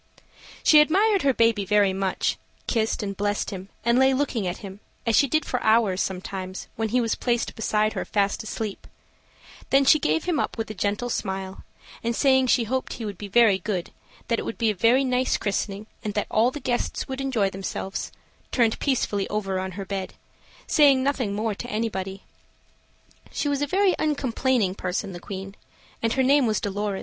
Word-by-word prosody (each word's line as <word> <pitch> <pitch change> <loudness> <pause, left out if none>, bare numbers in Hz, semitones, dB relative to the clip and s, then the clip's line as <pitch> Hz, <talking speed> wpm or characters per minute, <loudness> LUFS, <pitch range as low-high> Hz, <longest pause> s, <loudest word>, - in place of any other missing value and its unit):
She 305 - +7
admired 390 +6 +3
her 275 - +3
baby 230 -4 +2
very 205 -1 +3
much; 190 -1 -1 0.3
kissed 225 -1 0
and 200 -1 -4
blessed 205 +1 -1
him, 190 0 -7 0.2
and 235 +1 +4
lay 265 0 +4
looking 255 -8 -1
at 175 - -3
him, 195 +1 -9 0.3
as 230 -2 +2
she 280 - +5
did 310 +3 +1
for 250 - -2
hours 220 -4 +3
sometimes, 185 0 -5
when 220 0 -1
he 250 +4 +2
was 230 -2 +1
placed 240 -1 -1
beside 215 -1 +1
her - - -2
fast 200 -1 0
asleep; 220 -2 -5 0.8
then 275 0 +4
she 310 - +6
gave 160 - +1
him 335 -5 0
up - - -2
with 225 -1 -3
a - - -5
gentle 205 +4 -2
smile, 190 -2 -4 0.4
and, 235 0 -1
saying 265 -1 +4
she 245 -1 +3
hoped 255 +4 -2
he 230 - -6
would 200 -4 -6
be 205 - -6
very 210 -2 +4
good, 185 -2 -3 0.4
that 230 - +1
it - - -3
would - - -5
be 225 -2 +2
a - - -3
very 230 +7 +3
nice 255 0 +1
christening, 200 0 -2 0.2
and 210 -1 -4
all 225 +3 +4
the 295 - -7
guests 245 -2 -2
would 265 0 -4
enjoy 230 -8 0
themselves, 195 0 -4 0.4
turned 230 -3 +2
peacefully 215 -7 0
over 195 -3 -1
on 190 0 -4
her 195 +1 -6
bed, 190 -1 -4 0.5
saying 280 -4 +5
nothing 260 -7 0
more 215 +1 -1
to 245 +4 -7
anybody. 195 -4 -3 1.1
She - - -2
was 285 -1 0
a 290 - +1
very 380 +4 +3
uncomplaining 260 -8 +1
person, 190 +1 -3
the 175 - -7
Queen 195 +1 -7 0.5
and 230 0 +1
her 265 - +2
name 275 -1 +4
was 215 - +1
Dolorez. 205 -1 -2
220 Hz, 190 wpm, -25 LUFS, 195-260 Hz, 1.1 s, She